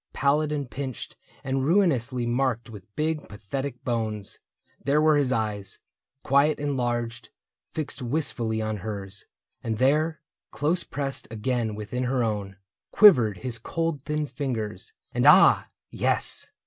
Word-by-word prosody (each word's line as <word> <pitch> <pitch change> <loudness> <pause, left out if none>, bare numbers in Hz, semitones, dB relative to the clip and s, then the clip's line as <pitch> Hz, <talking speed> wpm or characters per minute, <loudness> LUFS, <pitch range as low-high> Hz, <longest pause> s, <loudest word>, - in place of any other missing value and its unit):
Pallid 150 +2 +2
and 145 -3 -2
pinched 130 -1 -6 0.3
and 135 0 -1
ruinously 135 - +2
marked 120 -1 0
With 105 -1 -13
big 155 0 -2
pathetic 125 +6 -5
bones; 110 -4 -3 0.4
there 140 +3 +3
were 155 0 +5
his 140 -3 +2
eyes. 105 -4 -2 0.5
Quiet 140 +3 +3
and 145 -1 -1
large, 120 -2 -2 0.4
fixed 155 -3 -4
wistfully 120 -5 -1
on 110 0 -2
hers; 100 -1 -6 0.4
And 110 -2 -2
there, 155 +6 +2 0.3
close 165 +5 0
pressed 135 -1 -4
again 115 0 -2
within 125 +4 -3
her 125 -1 +1
own. 105 -3 -2 0.3
Quivered 125 - +6
his 120 -2 -3
cold 165 +4 -2
thin 150 +1 -2
fingers. 115 -9 -4 0.2
And, - - +2
ah! - - +7 0.2
yes. - - +1
125 Hz, 135 wpm, -26 LUFS, 110-145 Hz, 0.5 s, ah